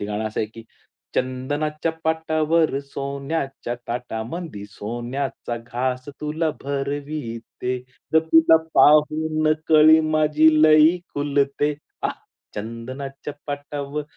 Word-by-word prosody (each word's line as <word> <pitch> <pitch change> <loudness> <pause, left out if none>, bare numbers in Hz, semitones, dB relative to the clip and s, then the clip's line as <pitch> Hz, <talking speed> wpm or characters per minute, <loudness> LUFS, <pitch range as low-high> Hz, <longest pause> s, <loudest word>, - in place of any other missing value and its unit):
ते - - -3
गाणं 105 +1 -3
असं 110 - -3
आहे, 110 - 0
की 115 0 -12 0.5
चंदनाच्या 145 +5 -1
पाटावर 160 -2 +1
सोन्याच्या 140 -2 -4
ताटामंदी, 120 - -5
सोन्याचा 120 +4 -4
घास 125 +3 -3
तुला 155 +2 -1
भरविते, 140 -3 -4 0.4
ग 160 - +8
तुला 160 0 +7 0.2
पाहून 155 +2 +4 0.2
कळी 155 0 +7
माझी 155 0 +4
लई 155 +3 +6 0.2
खुलते. 145 0 +1 0.3
आं, - - 0 0.4
चंदनाच्या 130 +6 -6
पाटावर 145 0 -4
140 Hz, 95 wpm, -23 LUFS, 125-155 Hz, 0.5 s, ग